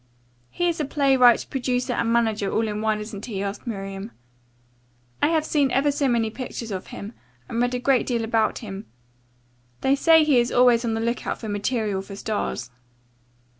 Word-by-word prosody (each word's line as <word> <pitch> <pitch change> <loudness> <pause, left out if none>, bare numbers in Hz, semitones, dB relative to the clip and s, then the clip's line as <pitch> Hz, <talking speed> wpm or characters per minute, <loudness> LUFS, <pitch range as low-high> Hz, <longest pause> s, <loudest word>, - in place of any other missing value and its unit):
"He 350 - -1
is 340 -2 -1
a 300 - 0
playwright, 265 -4 +4
producer 250 -1 -1
and 230 -1 0
manager 220 -4 +1
all 225 0 +1
in 210 0 -3
one, 215 -1 0
isn't 210 -1 -7
he?" 200 -4 -3
asked 200 +5 -5
Miriam. 195 -1 -5 1.1
"I - - +4
have 315 -1 +1
seen 285 -4 +2
ever 270 +3 +2
so 280 0 0
many 230 -3 +1
pictures 235 -2 -6
of 185 -1 -5
him, 205 +3 -8 0.3
and 230 - -2
read 245 +1 +1
a - - -1
great 260 0 +2
deal 235 -3 0
about 225 0 +1
him. 195 0 -7 0.9
They 265 - +3
say 320 +3 +5
he 290 -5 +4
is 240 - 0
always 245 -1 +4
on 225 -2 -1
the 225 - -2
lookout 235 +1 -2
for 220 - -6
material 205 -1 -1
for 195 +1 -9
stars." 200 - -3
235 Hz, 185 wpm, -24 LUFS, 210-260 Hz, 1.1 s, say